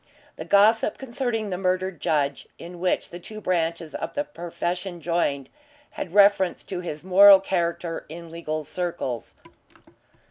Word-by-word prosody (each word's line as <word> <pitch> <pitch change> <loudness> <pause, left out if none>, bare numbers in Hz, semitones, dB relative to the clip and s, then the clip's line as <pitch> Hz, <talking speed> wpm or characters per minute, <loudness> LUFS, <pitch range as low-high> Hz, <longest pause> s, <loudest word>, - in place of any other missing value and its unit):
The - - -7
gossip 210 +2 +4
concerning 235 -5 -3
the 180 - -3
murdered 185 -2 -1
judge 140 -3 0
in 175 0 -10
which 180 +1 -1
the 175 - -8
two 215 +4 -9
branches 165 -5 -1
of - - -5
the 290 - 0
profession 175 - -5
joined 150 -5 -1 0.4
had 180 - -7
reference 200 -3 +4
to 185 - -5
his 160 -4 -6
moral 195 +1 +8
character 170 -3 -2
in 165 +1 -9
legal 155 -2 -4
circles. 170 - -4
175 Hz, 140 wpm, -24 LUFS, 165-195 Hz, 0.4 s, moral